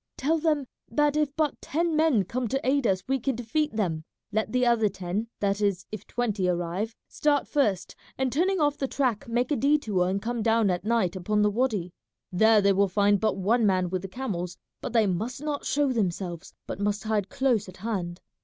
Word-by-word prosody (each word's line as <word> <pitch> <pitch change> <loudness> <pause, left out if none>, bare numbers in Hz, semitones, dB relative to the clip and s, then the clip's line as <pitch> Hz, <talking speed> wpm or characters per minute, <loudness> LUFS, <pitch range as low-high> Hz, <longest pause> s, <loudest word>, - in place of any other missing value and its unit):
Tell 320 +4 +1
them 300 -3 +1 0.2
that 295 +4 +2
if 300 -2 0
but 310 -3 -1
ten 330 +1 0
men 305 -9 +3
come 245 +6 -3
to 270 +3 -2
aid 270 -2 +2
us 185 -2 +1
we 270 +1 +1
can 265 +1 -1
defeat 245 +4 -1
them; 170 -7 -1 0.3
let 215 0 -1
the 250 0 +2
other 230 -3 +3
ten, 190 +4 -3
that 200 0 0
is 200 -3 0
if 215 - -7
twenty 215 -6 -1
arrive, 180 +6 -2
start 290 -2 +1
first, 210 -11 0 0.2
and 260 -2 0
turning 370 +6 +2
off 290 -1 +1
the 270 - 0
track 255 -6 -1
make 240 +4 0
a - - +3
detour 230 -11 +2
and 195 +1 0
come 235 +2 -3
down 225 -2 +3
at 180 - -2
night 220 -5 +1
upon 210 +3 +1
the 210 - +3
wady. 210 -7 -1 0.4
There 220 +3 +5
they 200 0 +4
will 200 +1 +3
find 205 +1 +3
but 220 0 0
one 225 +5 +2
man 185 -3 +2
with 185 -1 -1
the 195 - -6
camels; 180 -6 -4 0.2
but - - -4
they 225 -2 +4
must 220 +9 -2
not 295 -2 -3
show 285 -2 +1
themselves, 180 -5 -3
but - - -6
must 205 +1 -1
hide 215 -3 -1
close 260 -8 +1
at 185 - -13
hand. 185 -4 -4
220 Hz, 210 wpm, -27 LUFS, 195-265 Hz, 0.4 s, There